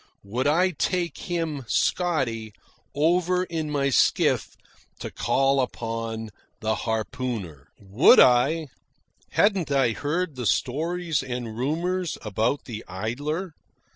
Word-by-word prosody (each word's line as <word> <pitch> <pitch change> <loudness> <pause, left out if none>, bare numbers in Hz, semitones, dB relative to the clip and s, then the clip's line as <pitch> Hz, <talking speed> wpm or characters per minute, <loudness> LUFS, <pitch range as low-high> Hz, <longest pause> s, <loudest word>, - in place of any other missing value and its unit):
Would 120 +7 -2
I 180 +5 +3
take 175 +2 -1
him, 165 -5 -2
Scotty, 125 - 0 0.4
over 180 +4 +2
in 165 -4 -4
my 140 -2 0
skiff - - +2 0.4
to - - -6
call 135 +3 +2
upon 115 -2 -4 0.3
the 110 0 0
harpooner? 110 - -4
Would 105 - +5
I! 135 +5 +4 0.6
Hadn't 195 -7 +2
I 135 -4 +3
heard 155 +7 -2
the 125 -3 -2
stories 165 - 0
and 120 -4 -5
rumours 170 +7 -1
about 110 +6 -1
the 115 -3 -7
Idler? 145 - -3
135 Hz, 110 wpm, -25 LUFS, 115-165 Hz, 0.6 s, Would